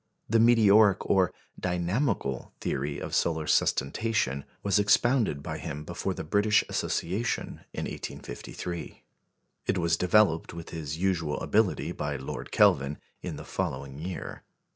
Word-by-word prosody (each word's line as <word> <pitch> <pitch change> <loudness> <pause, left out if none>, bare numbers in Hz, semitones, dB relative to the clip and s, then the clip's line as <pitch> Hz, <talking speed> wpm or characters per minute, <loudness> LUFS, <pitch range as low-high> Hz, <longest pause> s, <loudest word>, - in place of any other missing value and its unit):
The 115 +1 +3
meteoric, 110 -4 +6
or 95 -2 +3 0.3
"dynamical," 90 - -1
theory 70 +2 -2
of - - -6
solar 80 -2 +1
sustentation 70 - +1 0.2
was 100 0 +3
expounded 105 - +3
by - - -4
him 75 +1 -5
before 85 +3 -3
the - - -5
British 105 +6 +3
Association 100 +8 -2
in - - -4
1853. 85 +7 -6 0.6
It 95 - +1
was 85 -1 +2
developed 90 -3 +3
with 85 0 -8
his 80 -2 -4
usual 85 -5 0
ability - - +1
by 75 -1 -3
Lord 65 -1 -6
Kelvin, 70 +2 +4 0.2
in - - -5
the - - -8
following 70 +1 -4
year. 90 +3 -6
85 Hz, 130 wpm, -28 LUFS, 75-105 Hz, 0.6 s, meteoric